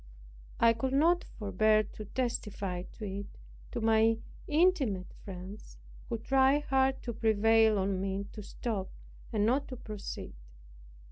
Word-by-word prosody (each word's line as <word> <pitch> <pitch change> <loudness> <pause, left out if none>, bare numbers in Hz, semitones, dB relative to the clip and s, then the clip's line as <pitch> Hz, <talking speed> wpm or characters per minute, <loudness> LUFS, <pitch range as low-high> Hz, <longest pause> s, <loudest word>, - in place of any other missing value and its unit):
I 230 0 +6
could 260 +3 -2
not 335 +5 +4
forbear 215 +1 +2
to 215 0 -9
testify 205 -6 -3 0.2
it 200 -1 -6 0.3
to - - -3
my 220 0 +4
most 225 0 +2 0.3
intimate 295 - +2
friends, 190 +1 -9 0.3
who 235 - -1
tried 270 +4 +3
hard 265 -1 +1
to 235 - -3
prevail 225 0 +4
on 190 -1 0
me 195 +1 -2
to 210 - -8
stop, 205 -1 -4 0.4
and 210 -3 +1
not 270 +5 +2
to 255 - -7
proceed. 215 -3 -7
220 Hz, 135 wpm, -31 LUFS, 200-260 Hz, 0.4 s, I